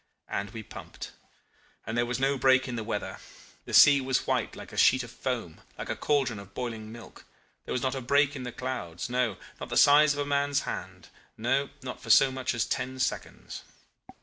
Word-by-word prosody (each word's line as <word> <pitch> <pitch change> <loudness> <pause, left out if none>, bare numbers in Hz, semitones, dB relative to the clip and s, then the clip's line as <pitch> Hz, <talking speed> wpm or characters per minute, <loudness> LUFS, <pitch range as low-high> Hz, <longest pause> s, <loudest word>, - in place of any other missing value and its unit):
And 100 0 -3
we 110 +1 -8
pumped. - - -10 0.7
And 110 - -4
there 120 0 +1
was 125 +1 -2
no 135 +1 +2
break 130 0 +3
in 125 - -4
the 115 - -3
weather. 105 -2 -4 0.5
The - - -8
sea 140 -1 +8
was 130 -1 0
white - - -1
like - - -11
a - - -8
sheet 130 0 +5
of 120 - -10
foam, 120 -11 -4 0.2
like - - -6
a - - -2
caldron 135 -7 0
of 100 0 -13
boiling 115 -3 -5
milk; 120 0 -12 0.4
there - - -7
was 125 - -1
not 130 - 0
a 135 - -4
break 140 +3 +2
in 135 - -6
the 125 -1 -5
clouds, 120 -7 -5
no 125 -6 0 0.2
not - - -7
the - - -1
size 150 +1 +6
of - - -5
a 145 - 0
man's 145 0 +1
hand - - -7 0.3
no, 135 +5 0
not 125 -1 -7
for 115 - -10
so 135 +4 +6
much 130 -1 -2
as 115 - 0
ten 130 +1 -3
seconds. 130 - -4
125 Hz, 210 wpm, -28 LUFS, 115-135 Hz, 0.7 s, sea